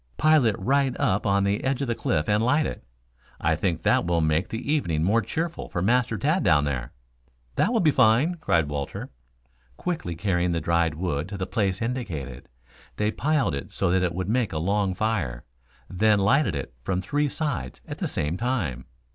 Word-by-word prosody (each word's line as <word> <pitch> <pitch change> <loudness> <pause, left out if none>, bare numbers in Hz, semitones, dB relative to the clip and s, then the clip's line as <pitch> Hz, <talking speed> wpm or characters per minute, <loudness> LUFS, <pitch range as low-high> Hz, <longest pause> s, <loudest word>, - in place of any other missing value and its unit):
Pile 155 -3 +4
it 105 - +1
right 135 +5 +1
up 105 -6 +1
on 100 0 +3
the 100 +1 0
edge 135 -1 0
of - - -2
the 120 - +1
cliff 75 -8 -1
and 105 +1 +2
light 145 +5 +3
it. - - -5 0.6
I 80 +1 +2
think 85 -1 -1
that - - +3
will 85 -1 +1
make 80 +2 +1
the 115 +6 -2
evening 85 - 0
more 110 +6 +3
cheerful 165 - -4
for - - -3
Master 120 +4 +2
Tad 155 +7 +1
down 75 -3 +4
there." 65 -4 -3 0.6
"That - - +2
will 230 - +2
be 155 -3 +4
fine," 125 +7 +4
cried 80 - +2
Walter. 70 -1 -5 0.7
Quickly 160 - -3
carrying 90 0 0
the 85 - 0
dried 85 -1 +1
wood 85 -1 -2
to 100 - -5
the 95 - -2
place 100 -1 -1
indicated, 80 - -4 0.5
they 105 0 0
piled 150 - +1
it 70 -1 -5
so - - 0
that 95 0 +3
it 90 -2 -1
would 95 0 -2
make 115 +1 +1
a - - -2
long 95 +3 0
fire, 85 - -1 0.4
then 105 +3 +3
lighted 100 - +2
it 70 -3 -5
from 90 +8 -1
three 145 +9 0
sides 135 - -3
at - - -7
the - - -1
same 75 +4 -2
time. 90 - -2
100 Hz, 195 wpm, -25 LUFS, 80-125 Hz, 0.7 s, Pile